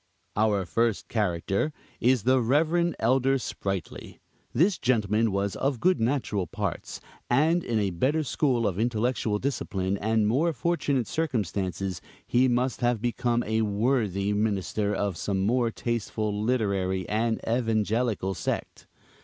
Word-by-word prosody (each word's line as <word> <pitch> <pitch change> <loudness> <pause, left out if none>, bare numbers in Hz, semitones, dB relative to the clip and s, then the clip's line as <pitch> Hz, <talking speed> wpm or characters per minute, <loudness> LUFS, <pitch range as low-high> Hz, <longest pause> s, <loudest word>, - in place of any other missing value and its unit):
Our 105 -3 +2
first 115 +4 0
character, 100 - 0 0.3
is 125 -3 +3
the 130 +2 +4
Reverend 160 +7 +2
Elder 130 +3 +2
Sprightly. 95 - -5 0.3
This 175 - +2
gentleman 110 -3 +2
was 100 0 -1
of 135 -3 -1
good 185 +6 +3
natural 115 -6 0
parts; - - -4 0.3
and 160 +7 +3
in 115 - -1
a 100 -3 +1
better 140 - +1
school 130 -4 +1
of 95 -1 -1
intellectual 115 -1 0
discipline 100 -6 -2
and 110 0 +1
more 155 +10 +2
fortunate 140 -3 0
circumstances, 95 - -2 0.2
he 125 +2 +3
must 125 +1 0
have 120 -2 +2
become 120 +1 0
a 110 +1 0
worthy 105 -2 +1
minister 105 0 0
of 100 -3 -1
some 95 +2 -1
more 120 +4 +2
tasteful, 110 -2 -2
literary 100 -5 0
and 110 +1 0
evangelical 110 -3 0
sect. 90 - -4
115 Hz, 130 wpm, -27 LUFS, 100-130 Hz, 0.3 s, the